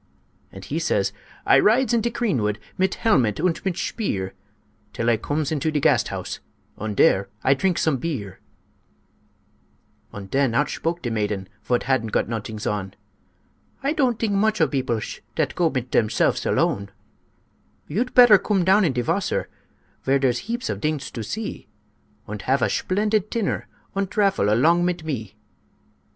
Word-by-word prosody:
And -, -, -10 dB
he -, -, -2 dB
says, -, -, 0 dB, 0.3 s
"I -, -, +6 dB
rides 245 Hz, +4 st, +3 dB
in 235 Hz, -, +3 dB
de 235 Hz, -, 0 dB
creenwood 125 Hz, -, 0 dB, 0.2 s
Mit 190 Hz, 0 st, +1 dB
helmet 125 Hz, -, +2 dB
und 180 Hz, -3 st, 0 dB
mit 190 Hz, -3 st, -1 dB
shpeer, 100 Hz, -, -2 dB, 0.6 s
Till 115 Hz, -, -2 dB
I -, -, +4 dB
cooms 145 Hz, +5 st, -2 dB
into 155 Hz, 0 st, -1 dB
em 155 Hz, -1 st, 0 dB
Gasthaus, -, -, 0 dB, 0.4 s
Und 105 Hz, 0 st, -4 dB
dere 95 Hz, +1 st, +4 dB, 0.2 s
I 135 Hz, -, +5 dB
trinks 180 Hz, +6 st, 0 dB
some 155 Hz, -4 st, +2 dB
beer." 120 Hz, -, -4 dB, 1.7 s
Und 100 Hz, -2 st, -9 dB
den 135 Hz, -3 st, +2 dB
outshpoke 165 Hz, +5 st, -1 dB
de 120 Hz, -, -2 dB
maiden 105 Hz, -3 st, -2 dB, 0.2 s
Vot 120 Hz, -1 st, 0 dB
hadn't 125 Hz, -4 st, 0 dB
got -, -, +1 dB
nodings 110 Hz, -1 st, -5 dB
on: 95 Hz, -2 st, -3 dB, 0.9 s
"I 280 Hz, +2 st, +1 dB
tont 260 Hz, -7 st, +1 dB
dink 220 Hz, -3 st, -1 dB
mooch 215 Hz, +1 st, +2 dB
of 160 Hz, -, +3 dB
beoplesh 130 Hz, -6 st, -2 dB, 0.2 s
Dat -, -, 0 dB
goes 170 Hz, -3 st, +1 dB
mit 125 Hz, -2 st, -3 dB
demselfs 110 Hz, -1 st, +1 dB
alone. 100 Hz, 0 st, +1 dB, 1.0 s
"You'd 230 Hz, +11 st, -2 dB
petter 240 Hz, -5 st, +8 dB
coom 195 Hz, -3 st, 0 dB
down 195 Hz, +3 st, +5 dB
in 160 Hz, -7 st, +2 dB
de 125 Hz, -1 st, -1 dB
wasser, -, -, -1 dB, 0.5 s
Vere 135 Hz, +1 st, +3 dB
deres 130 Hz, -, 0 dB
heaps 240 Hz, +3 st, -2 dB
of -, -, -3 dB
dings 155 Hz, -2 st, -2 dB
to 115 Hz, -, -5 dB
see, 215 Hz, -, -5 dB, 0.6 s
Und -, -, -6 dB
hafe -, -, +2 dB
a -, -, +2 dB
shplendid 210 Hz, +1 st, 0 dB
tinner 230 Hz, -4 st, -2 dB, 0.3 s
Und 195 Hz, -1 st, -1 dB
drafel 195 Hz, -, +2 dB
along 165 Hz, +10 st, +4 dB
mit 175 Hz, -1 st, -1 dB
me. 125 Hz, -10 st, -5 dB
155 Hz, 160 wpm, -23 LUFS, -, 1.7 s, petter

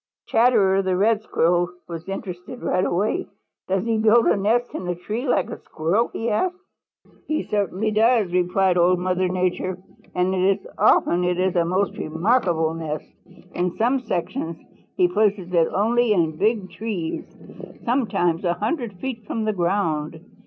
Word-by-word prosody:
Chatterer 215 Hz, -5 st, +3 dB
the 185 Hz, -1 st, 0 dB
Red 215 Hz, +2 st, +3 dB
Squirrel 175 Hz, -3 st, +1 dB, 0.2 s
was 170 Hz, +1 st, -7 dB
interested 190 Hz, +5 st, -7 dB
right 185 Hz, 0 st, +1 dB
away. 210 Hz, -, 0 dB, 0.4 s
"Does 190 Hz, +1 st, 0 dB
he 225 Hz, -1 st, +1 dB
build 225 Hz, +2 st, +5 dB
a -, -, +4 dB
nest 225 Hz, +5 st, +1 dB
in 180 Hz, -, -5 dB
a 180 Hz, -, -1 dB
tree 215 Hz, +9 st, -4 dB
like 195 Hz, -7 st, +1 dB
a -, -, -7 dB
Squirrel?" 170 Hz, +9 st, 0 dB
he 225 Hz, -, -3 dB
asked. 350 Hz, -, 0 dB, 0.7 s
"He 310 Hz, -, -1 dB
certainly 205 Hz, +1 st, -1 dB
does," 220 Hz, -3 st, +3 dB
replied 180 Hz, 0 st, +2 dB
Old 180 Hz, +1 st, +4 dB
Mother 185 Hz, +1 st, 0 dB
Nature, 185 Hz, 0 st, -1 dB, 0.4 s
"and 190 Hz, +2 st, +2 dB, 0.2 s
often 175 Hz, +1 st, +3 dB
it 180 Hz, 0 st, 0 dB
is 185 Hz, 0 st, +1 dB
a 170 Hz, -1 st, +3 dB
most 185 Hz, +3 st, 0 dB
remarkable 165 Hz, -1 st, +1 dB
nest. 155 Hz, -2 st, -5 dB, 0.4 s
In 180 Hz, 0 st, -2 dB
some 250 Hz, +4 st, +2 dB
sections 175 Hz, -5 st, -3 dB, 0.4 s
he 365 Hz, -2 st, +5 dB
places 205 Hz, -, 0 dB
it 165 Hz, -2 st, +4 dB
only 230 Hz, +3 st, +2 dB
in 165 Hz, -5 st, +1 dB
big 205 Hz, +2 st, 0 dB
trees, 200 Hz, -7 st, -4 dB, 0.6 s
sometimes 200 Hz, -9 st, +1 dB
a 175 Hz, -1 st, +2 dB
hundred 220 Hz, -, -2 dB
feet 225 Hz, +2 st, -6 dB
from 225 Hz, -, -2 dB
the 215 Hz, -, 0 dB
ground. 170 Hz, -4 st, -1 dB
190 Hz, 155 wpm, -23 LUFS, 175-220 Hz, 0.7 s, build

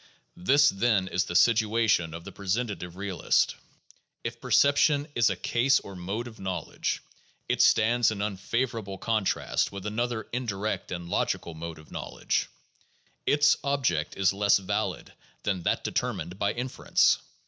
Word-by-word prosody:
This, 145 Hz, +7 st, +5 dB
then, 100 Hz, -3 st, +1 dB
is 95 Hz, 0 st, 0 dB
the 85 Hz, -, -6 dB
situation 110 Hz, -6 st, +3 dB
of 85 Hz, -, -8 dB
the 100 Hz, -, -9 dB
presentative 100 Hz, -2 st, -3 dB
realist: 100 Hz, -1 st, +1 dB, 0.7 s
If 115 Hz, 0 st, -5 dB
perception 140 Hz, +3 st, +3 dB
is 115 Hz, -4 st, +3 dB
a -, -, -1 dB
case 130 Hz, +3 st, +2 dB
or 100 Hz, -, -10 dB
mode 100 Hz, +6 st, -4 dB
of 115 Hz, -2 st, -12 dB
knowledge, 95 Hz, -4 st, -3 dB, 0.4 s
it -, -, +1 dB
stands 115 Hz, +1 st, +4 dB
in 110 Hz, -2 st, -4 dB
un 105 Hz, -1 st, -1 dB
favorable 110 Hz, 0 st, -2 dB
contrast 110 Hz, -2 st, 0 dB
with 100 Hz, 0 st, -8 dB
another 110 Hz, +1 st, -2 dB
indirect 110 Hz, -4 st, -3 dB
and 85 Hz, -1 st, -5 dB
logical 85 Hz, 0 st, -1 dB
mode 80 Hz, 0 st, -7 dB
of 80 Hz, -, -16 dB
knowl -, -, -7 dB
edge; -, -, 0 dB, 0.8 s
its 145 Hz, 0 st, +4 dB
object 125 Hz, -, 0 dB
is 95 Hz, -1 st, +3 dB
less 100 Hz, +1 st, +4 dB
valid 100 Hz, -2 st, -3 dB, 0.3 s
than 95 Hz, -3 st, -1 dB
that -, -, 0 dB
determined 90 Hz, +3 st, -3 dB
by 100 Hz, 0 st, +1 dB
inference. 125 Hz, +1 st, +2 dB
105 Hz, 150 wpm, -27 LUFS, 95-120 Hz, 0.8 s, This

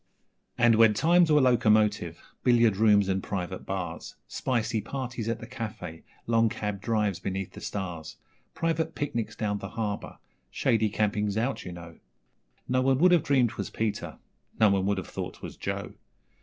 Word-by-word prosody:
And 120 Hz, -1 st, +5 dB
when 110 Hz, -2 st, +6 dB
times 170 Hz, +6 st, +4 dB
were 150 Hz, -1 st, +6 dB
locomotive, 110 Hz, -4 st, +2 dB, 0.2 s
billiard 115 Hz, -4 st, +4 dB
rooms 105 Hz, -1 st, +4 dB
and 95 Hz, 0 st, 0 dB
private 95 Hz, -1 st, -5 dB
bars 95 Hz, -2 st, -5 dB
Spicy 115 Hz, -3 st, -1 dB
parties 120 Hz, -1 st, -4 dB
at 115 Hz, 0 st, -2 dB
the 115 Hz, -, -8 dB
cafe 110 Hz, -9 st, -7 dB, 0.2 s
long 115 Hz, -1 st, +3 dB
cab 105 Hz, -2 st, -4 dB
drives 105 Hz, -4 st, 0 dB
beneath 95 Hz, -1 st, -4 dB
the -, -, -11 dB
stars; 85 Hz, -6 st, -5 dB, 0.4 s
Private 165 Hz, -1 st, -1 dB
picnics 120 Hz, -7 st, -3 dB
down 105 Hz, -2 st, -2 dB
the 95 Hz, -, -6 dB
Harbour 105 Hz, -1 st, -4 dB, 0.3 s
shady 110 Hz, -1 st, +1 dB
campings 105 Hz, 0 st, 0 dB
out, 120 Hz, +5 st, -1 dB
you 90 Hz, -, -6 dB
know 85 Hz, -1 st, -11 dB, 0.7 s
No 130 Hz, 0 st, +2 dB
one 135 Hz, 0 st, +3 dB
would 180 Hz, +5 st, +5 dB
have 175 Hz, -3 st, +5 dB
dreamed 130 Hz, -4 st, +3 dB
'twas -, -, -5 dB
Peter 100 Hz, -, -3 dB, 0.4 s
no 110 Hz, -2 st, +6 dB
one 95 Hz, -1 st, +1 dB
would 100 Hz, 0 st, +1 dB
have 95 Hz, -, -4 dB
thought -, -, -5 dB
'twas -, -, -9 dB
Joe! -, -, -4 dB
110 Hz, 165 wpm, -28 LUFS, 100-120 Hz, 0.7 s, when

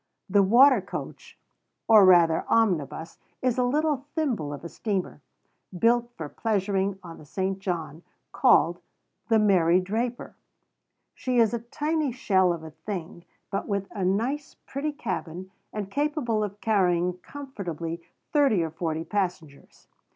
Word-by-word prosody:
The 200 Hz, +1 st, +4 dB
water 240 Hz, +4 st, +6 dB
coach, 195 Hz, -, -8 dB, 0.5 s
or 215 Hz, -3 st, +8 dB
rather 170 Hz, -3 st, +5 dB
omnibus, 165 Hz, -8 st, 0 dB, 0.2 s
is 255 Hz, -1 st, +1 dB
a -, -, +3 dB
little 290 Hz, +1 st, 0 dB
thimble 245 Hz, -, -1 dB
of 145 Hz, -, -7 dB
a -, -, -5 dB
steamer, 195 Hz, +1 st, -3 dB, 0.6 s
built 235 Hz, +4 st, +3 dB
for 160 Hz, -, -5 dB
pleasuring 195 Hz, 0 st, -1 dB
on 165 Hz, -2 st, -10 dB
the -, -, -12 dB
St. 190 Hz, +4 st, -2 dB
John's, 165 Hz, -5 st, -4 dB, 0.3 s
called -, -, +3 dB, 0.5 s
"The 225 Hz, -, +4 dB
Mary 185 Hz, -5 st, +4 dB
Draper." 230 Hz, +6 st, -3 dB, 0.8 s
She 255 Hz, -1 st, -2 dB
is 230 Hz, -1 st, +4 dB
a 235 Hz, -, -1 dB
tiny 295 Hz, +5 st, -2 dB
shell 190 Hz, -7 st, +2 dB
of 165 Hz, -2 st, -4 dB
a 160 Hz, -, -9 dB
thing, 170 Hz, +1 st, -7 dB, 0.3 s
but 195 Hz, -, -2 dB
with 200 Hz, -2 st, -2 dB
a 200 Hz, -, -4 dB
nice, 235 Hz, +10 st, -1 dB
pretty 285 Hz, +3 st, -3 dB
cabin, 185 Hz, -, -5 dB, 0.2 s
and 200 Hz, -2 st, -5 dB
capable 285 Hz, -6 st, 0 dB
of 205 Hz, 0 st, -5 dB
carrying 180 Hz, -4 st, +1 dB
comfortably 175 Hz, -, -6 dB, 0.3 s
thirty 275 Hz, -, +3 dB
or 160 Hz, -, -4 dB
forty 160 Hz, -1 st, -3 dB
passengers. 175 Hz, -8 st, -4 dB
200 Hz, 140 wpm, -26 LUFS, 175-240 Hz, 0.8 s, or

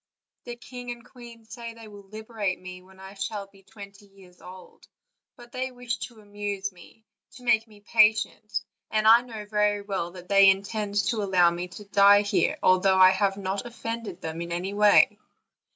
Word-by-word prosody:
The 240 Hz, -, -6 dB
king 245 Hz, +1 st, -10 dB
and 240 Hz, 0 st, -7 dB
queen 235 Hz, -2 st, -14 dB
say 230 Hz, +1 st, -9 dB
that -, -, -16 dB
they 220 Hz, -, -11 dB
will 205 Hz, -2 st, -14 dB
liberate 215 Hz, -3 st, -4 dB
me 180 Hz, 0 st, -10 dB
when 190 Hz, +1 st, -20 dB
I 190 Hz, 0 st, -11 dB
shall 200 Hz, +1 st, -5 dB
be 195 Hz, 0 st, -22 dB
twenty 200 Hz, 0 st, -14 dB
years 190 Hz, -2 st, -20 dB
old; 185 Hz, 0 st, -14 dB, 0.5 s
but 240 Hz, 0 st, -15 dB
they 260 Hz, +1 st, -3 dB
wish 245 Hz, -1 st, -5 dB
to 235 Hz, -3 st, -19 dB
amuse 205 Hz, -1 st, -5 dB
me, 190 Hz, +5 st, -18 dB, 0.3 s
to 250 Hz, -, -14 dB
make 225 Hz, -2 st, +2 dB
me 210 Hz, -2 st, -18 dB
patient, 215 Hz, -1 st, +2 dB, 0.3 s
and 215 Hz, 0 st, +1 dB
I 230 Hz, +2 st, +8 dB
know 225 Hz, -4 st, -9 dB
very 210 Hz, -1 st, 0 dB
well 195 Hz, -4 st, -3 dB
that 180 Hz, -1 st, -12 dB
they 195 Hz, 0 st, +6 dB
intend 200 Hz, +1 st, -1 dB
to 225 Hz, -3 st, -1 dB
allow 185 Hz, -3 st, +3 dB
me 175 Hz, +1 st, -5 dB
to 205 Hz, +3 st, -12 dB
die 200 Hz, 0 st, +5 dB
here, 195 Hz, -4 st, 0 dB
although 185 Hz, +1 st, +4 dB
I 185 Hz, 0 st, +8 dB
have 195 Hz, 0 st, 0 dB
not 195 Hz, +3 st, -4 dB
offended 230 Hz, -5 st, -6 dB
them 160 Hz, +1 st, -5 dB
in 170 Hz, 0 st, -6 dB
any 180 Hz, +3 st, -3 dB
way." 210 Hz, 0 st, +4 dB
205 Hz, 190 wpm, -26 LUFS, 190-225 Hz, 0.5 s, I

